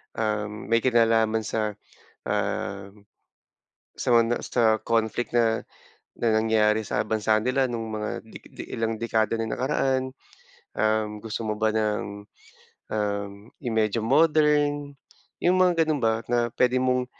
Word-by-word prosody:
um, 105 0 -3
may 115 - +5
kinalaman 115 -2 +2
sa, 105 -1 -2 0.5
ah, 95 0 -2 1.0
sa - - -5
mga 115 0 +3
sa 120 - -1 0.2
conflict 115 +1 0
na 115 -1 +2 0.5
na 115 - +1
nangyari 110 -1 +2
sa 105 - 0
bansa 110 0 +1
nila 130 +2 +1
nung 115 -2 -4
mga 105 -1 -4
de 110 - -11
de - - -9
mga - - -16
ilang 115 0 -1
dekada 110 -1 0
na 115 -1 -3
nakaraan? 130 0 -1 0.6
Um, 110 -1 0
gusto 115 +1 -5
mo 110 - -1
ba 110 - +3
ng, 105 -1 -2 0.7
um, 100 -1 -2 0.3
i 125 - -3
medyo 110 0 +1
modern? 145 +1 +2 0.5
Yung 180 +1 +4
mga 170 -3 +3
ganun 150 -3 -1
ba 115 0 0
na 120 -1 +1
pwede 125 0 +3
mong, 125 0 +1
115 Hz, 140 wpm, -25 LUFS, 110-125 Hz, 1.0 s, may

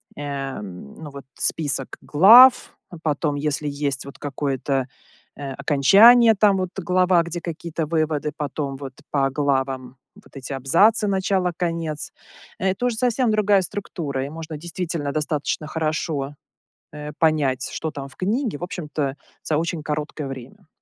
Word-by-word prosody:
эм, 135 - -6
ну 155 -2 -9
вот, 140 0 -9
список 140 -4 0
глав, 230 - +7
а 175 - -9
потом, 150 -1 0
если 150 +1 -2
есть 140 -2 -2
вот 140 - -11
какое-то, 135 -2 -2 0.5
э, 140 -1 -5
окончание, 200 - +6
там 200 -1 +4
вот 185 -1 -2
глава, 180 -1 +3
где 170 +1 -5
какие-то 165 -1 -4
выводы, 155 -2 -1
потом 140 -1 -3
вот 135 -1 -7 0.2
по 135 -2 +2
главам 135 -2 -1 0.2
вот - - -20
эти 135 +1 -8
абзацы: 195 - +3
начало, 190 -2 0
конец. 165 -3 -3 0.5
Это 190 +5 0
уже 235 -3 -2
совсем 245 0 +1
другая 205 -2 +3
структура, 155 -7 -4
и - - -6
можно 160 0 -7
действительно 170 -2 -4
достаточно 150 0 -2
хорошо, 155 -2 -2 0.6
э, 150 0 -7
понять, 145 -5 +1
что 160 - -3
там 140 -2 -7
в 135 - -18
книге, 215 - -1
в - - -7
общем-то, 150 -6 -3 0.3
за 155 - 0
очень 165 0 -2
короткое 150 -1 -4
время. 130 +2 -10
155 Hz, 145 wpm, -22 LUFS, 140-180 Hz, 0.6 s, глав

